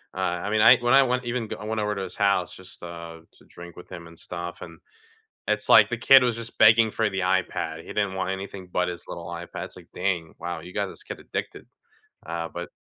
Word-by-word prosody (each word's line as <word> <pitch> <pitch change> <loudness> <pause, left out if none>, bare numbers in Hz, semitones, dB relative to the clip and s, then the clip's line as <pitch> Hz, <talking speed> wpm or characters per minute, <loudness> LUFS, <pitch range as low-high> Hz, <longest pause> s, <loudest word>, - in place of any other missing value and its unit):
uh, - - -10
I 90 +3 -1
mean, 110 0 +2
I 115 - +8
when 120 0 +1
I 135 0 +8
went 125 -1 -1
even 120 -1 -2
go - - -6
I 105 - -9
went 110 0 -2
over 105 0 -1
to 100 - -4
his 95 - -7
house, 100 -3 +1
just, 95 0 -14
uh, 85 -1 -8 0.2
to - - -21
drink 85 0 -12
with 90 - -13
him 85 -2 -8
and 85 0 -15
stuff, 85 0 -7
and, 85 -1 -10 0.7
it's - - 0
like - - +8
the - - -2
kid 135 -1 +7
was 120 -2 +1
just 115 0 -8
begging 110 -1 +6
for 110 -1 0
the 95 -1 -3
iPad, 90 -3 -1
he - - -17
didn't 100 -2 -1
want 95 0 -2
anything 95 -1 -6
but 90 0 +1
his 90 -1 -7
little 85 - -7
iPad. 85 0 -6
It's - - -13
like, - - -14
"Dang. 85 -4 -2
Wow, 85 -1 -4
you 85 +3 -11
got - - 0
this - - -11
kid - - -8
addicted." - - -6 0.6
Uh, 85 0 -4
but 85 0 -6
95 Hz, 250 wpm, -25 LUFS, 85-110 Hz, 0.7 s, I